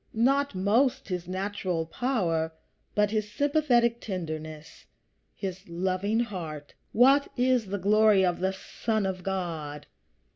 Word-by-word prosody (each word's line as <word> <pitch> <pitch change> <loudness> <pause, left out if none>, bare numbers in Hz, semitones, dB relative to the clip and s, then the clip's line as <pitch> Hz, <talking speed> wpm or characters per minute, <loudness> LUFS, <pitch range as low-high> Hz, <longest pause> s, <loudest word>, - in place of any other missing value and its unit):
Not 275 +2 +2
most 215 +7 +2
his 180 -2 -3
natural 185 -3 -2
power, 165 -6 -1 0.4
but 210 0 +2
his 215 -1 -1
sympathetic 250 -4 +2
tenderness, 155 -5 -6 0.5
his 190 -2 -6
loving 190 +5 0
heart. 160 -10 -6 0.2
What 270 +5 +5
is 250 -3 +2
the 200 +1 -2
glory 205 0 +4
of 175 -1 0
the 190 +1 +1
Son 215 +2 -2
of 185 -1 -3
God? 165 -6 -4
195 Hz, 120 wpm, -28 LUFS, 175-230 Hz, 0.5 s, What